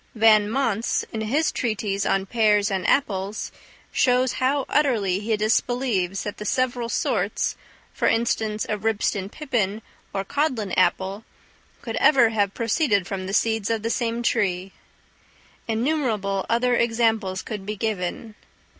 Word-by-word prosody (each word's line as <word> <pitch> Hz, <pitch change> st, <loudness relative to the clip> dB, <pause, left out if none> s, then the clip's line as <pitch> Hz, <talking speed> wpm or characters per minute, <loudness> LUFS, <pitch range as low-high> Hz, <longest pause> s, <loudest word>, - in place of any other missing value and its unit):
Van 215 Hz, -2 st, +5 dB
Mons, 230 Hz, -3 st, 0 dB
in 220 Hz, -, -4 dB
his 280 Hz, +9 st, +1 dB
treatise 205 Hz, -4 st, -1 dB
on 195 Hz, 0 st, +1 dB
pears 210 Hz, -2 st, +2 dB
and 190 Hz, -2 st, -1 dB
apples, 205 Hz, -6 st, 0 dB, 0.4 s
shows 250 Hz, 0 st, +2 dB
how 270 Hz, +1 st, +1 dB
utterly 220 Hz, -11 st, +1 dB
he 215 Hz, +1 st, -1 dB
disbelieves 215 Hz, -4 st, 0 dB
that 205 Hz, -, -5 dB
the -, -, -6 dB
several 245 Hz, +1 st, -1 dB
sorts, -, -, -1 dB, 0.4 s
for -, -, 0 dB
instance 220 Hz, -2 st, 0 dB
a 210 Hz, -, -2 dB
Ribston 205 Hz, -2 st, -1 dB
pippin 225 Hz, -7 st, -2 dB, 0.3 s
or 195 Hz, 0 st, -3 dB
Codlin 255 Hz, -7 st, -1 dB
apple, 190 Hz, +3 st, +1 dB, 0.6 s
could -, -, -4 dB
ever 260 Hz, -6 st, +5 dB
have 205 Hz, -3 st, 0 dB
proceeded 225 Hz, -, +1 dB
from 185 Hz, -1 st, -4 dB
the -, -, -4 dB
seeds 220 Hz, -1 st, +1 dB
of 225 Hz, -2 st, -1 dB
the 230 Hz, -, -1 dB
same 235 Hz, 0 st, -1 dB
tree. 190 Hz, -4 st, 0 dB, 1.0 s
Innumerable 225 Hz, -6 st, -1 dB
other 245 Hz, +2 st, +2 dB
examples 225 Hz, -5 st, +1 dB
could 210 Hz, -3 st, -6 dB
be 210 Hz, +2 st, -4 dB
given. 215 Hz, +1 st, -3 dB
220 Hz, 135 wpm, -24 LUFS, 200-235 Hz, 1.0 s, Van